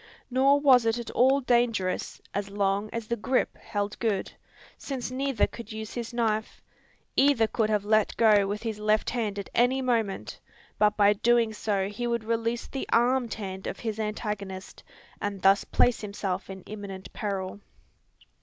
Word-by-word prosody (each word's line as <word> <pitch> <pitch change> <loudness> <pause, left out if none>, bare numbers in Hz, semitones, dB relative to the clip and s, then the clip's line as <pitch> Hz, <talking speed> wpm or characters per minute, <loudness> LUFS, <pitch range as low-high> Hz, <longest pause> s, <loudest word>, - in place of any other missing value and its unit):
Nor 270 +3 +4
was 255 -5 +5
it 225 +1 +2
at 235 - -5
all 265 +3 +4
dangerous, 235 -7 0
as 205 0 -2
long 200 +1 0
as 230 -1 -4
the 235 - -1
"grip" 250 +4 0
held 205 0 -3
good; 215 -5 -1 0.4
since 260 -3 -5
neither 265 -3 +1
could 230 -2 -9
use 220 0 -6
his 235 -1 -4
knife. 220 -2 -1 0.6
Either 270 -5 +4
could 220 0 0
have 210 -2 +1
let 215 0 +2
go 210 -3 +5
with 205 +2 -4
his 220 -2 -3
left 215 0 +1
hand 220 -5 -2
at 200 - -6
any 245 +2 +3
moment; 230 -6 -1 0.4
but 210 0 +3
by 205 0 +6
so 200 - -19
doing 235 -2 +3 0.4
he 240 +3 -3
would 235 -1 -1
release 230 +1 -1
the 270 - -5
armed 240 0 +2
hand 190 -3 -6
of - - -4
his 220 -2 -3
antagonist, 210 -3 -4 0.4
and 205 -2 -3
thus 195 +1 +5
place 245 - +2
himself 200 -3 -4
in 190 -1 -8
imminent 200 -3 -8
peril. 195 -2 -3
220 Hz, 165 wpm, -27 LUFS, 205-240 Hz, 0.6 s, by